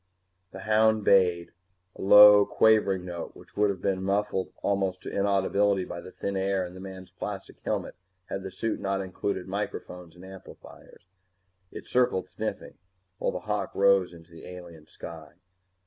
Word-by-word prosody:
The - - -10
hound 110 0 +3
bayed, 90 -4 +3 0.4
a - - -10
low 105 +1 +9
quavering 100 -4 +2
note 85 -2 -7
which - - -17
would 105 0 +2
have 95 -2 -4
been 95 -1 0
muffled 100 0 -1
almost 95 -2 -1
to - - -6
inaudibility 100 -1 +1
by 85 - -7
the 90 - -11
thin 100 - -4
air 95 -1 0
and 90 +1 -10
the - - -10
man's 95 -1 -10
plastic 95 +2 -7
helmet - - -3 0.3
had 95 - -5
the 95 - -6
suit 110 +4 -3
not 100 0 -1
included 95 0 -4
microphones 90 -3 -6
and 90 +1 -13
amplifiers. 95 -2 -14 0.7
It - - -9
circled, 120 -8 +1
sniffing, 105 +4 -6 0.4
while - - 0
the - - -5
hawk - - -3
rose 100 -2 +3
into 85 0 -16
the 85 - -12
alien 85 -4 -11
sky. 80 -2 -11
95 Hz, 165 wpm, -27 LUFS, 90-100 Hz, 0.7 s, low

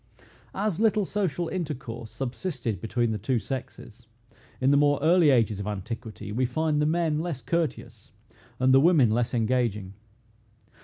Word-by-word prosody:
As 200 -2 -1
little 215 -2 +2
social 180 -4 -2
intercourse 135 -10 -5
subsisted 130 - -4
between 115 +1 0
the 110 - -3
two 120 +5 0
sexes, 120 -2 -7 0.5
in 130 +1 +3
the - - +5
more 145 0 +4
early 165 +1 +4
ages 115 -6 +2
of 100 - -4
antiquity, 105 +1 -6
we 120 +5 0
find 150 +4 0
the 150 - +2
men 160 -2 +1
less 160 -6 -4
courteous, 170 -2 -3 0.5
and 130 +1 +4
the 135 - +7
women 150 -8 +5
less 120 +2 0
engaging. 110 -5 0
130 Hz, 150 wpm, -26 LUFS, 115-160 Hz, 0.5 s, the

